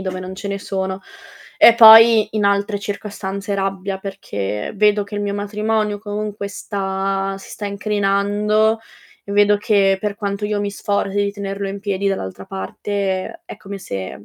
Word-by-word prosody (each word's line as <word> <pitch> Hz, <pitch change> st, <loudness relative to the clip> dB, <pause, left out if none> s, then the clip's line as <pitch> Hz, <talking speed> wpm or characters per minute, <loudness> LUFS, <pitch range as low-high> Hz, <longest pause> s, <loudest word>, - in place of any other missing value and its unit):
dove 185 Hz, -1 st, -4 dB
non 185 Hz, +1 st, -7 dB
ce 200 Hz, +1 st, -6 dB
ne 200 Hz, 0 st, -3 dB
sono" 190 Hz, -1 st, -4 dB, 0.6 s
e 230 Hz, -, +8 dB
poi, 225 Hz, -1 st, +9 dB
in 210 Hz, -, +1 dB
altre 200 Hz, +1 st, +1 dB
circostanze, 200 Hz, -1 st, -5 dB
rabbia 195 Hz, 0 st, -2 dB
perché 105 Hz, -, -5 dB
vedo 210 Hz, 0 st, +3 dB
che 205 Hz, -, -10 dB
il 205 Hz, -, -2 dB
mio 200 Hz, 0 st, -2 dB
matrimonio 210 Hz, +1 st, -1 dB
comunque 205 Hz, -1 st, -5 dB
sta 195 Hz, -1 st, -2 dB
si -, -, -13 dB
sta 205 Hz, -, -5 dB
incrinando 205 Hz, +2 st, +1 dB, 0.5 s
e 200 Hz, -, -6 dB
vedo 205 Hz, 0 st, +4 dB
che 200 Hz, -2 st, +2 dB
per 210 Hz, -1 st, -2 dB
quanto 200 Hz, -1 st, -3 dB
io 210 Hz, 0 st, -1 dB
mi 205 Hz, 0 st, -2 dB
sforzi 200 Hz, 0 st, -2 dB
di 200 Hz, 0 st, +1 dB
tenerlo 200 Hz, -1 st, -4 dB
in 200 Hz, +1 st, -6 dB
piedi, 200 Hz, -1 st, -1 dB
dall'altra 95 Hz, -, -4 dB
parte 190 Hz, -, -4 dB
è -, -, -9 dB
come 200 Hz, +1 st, -8 dB
se 100 Hz, -, -6 dB
200 Hz, 165 wpm, -19 LUFS, 195-205 Hz, 0.6 s, poi